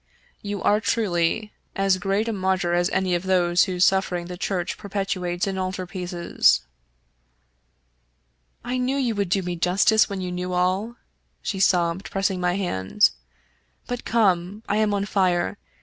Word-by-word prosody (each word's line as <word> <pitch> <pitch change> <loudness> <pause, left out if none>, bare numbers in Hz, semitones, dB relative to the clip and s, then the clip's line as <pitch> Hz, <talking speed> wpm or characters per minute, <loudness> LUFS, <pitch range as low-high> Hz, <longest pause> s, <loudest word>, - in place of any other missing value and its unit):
You 205 -1 -4
are 210 +1 +3
truly 210 -1 0 0.2
as 195 -1 +2
great 195 +4 0
a 230 - -1
martyr 185 -3 0
as 175 0 +2
any 190 -1 0
of 175 - +1
those 180 -2 +3
whose 185 -2 +2
sufferings 180 -2 0
the 180 - -5
Church 180 -1 -2
perpetuates 190 -3 -2
in 190 -1 -3
altar 185 0 -3
pieces." 175 -1 +1 1.0
" - - -45
I 250 +1 -2
knew 255 +2 0
you 250 -4 0
would 200 -3 -1
do 190 +1 +1
me 180 0 -3
justice 195 +6 +3
when 200 -1 -4
you 180 -1 -4
knew 180 0 -3
all," 185 +6 0 0.5
she 195 - -3
sobbed, 180 0 +2
pressing 195 -1 -1
my 180 0 +1
hand; 185 - +1 0.4
" - - -42
but 245 -1 -4
come. 200 -2 +1
I 205 - 0
am 215 -1 +2
on 200 0 -1
fire. 180 - 0
185 Hz, 165 wpm, -24 LUFS, 175-200 Hz, 1.0 s, are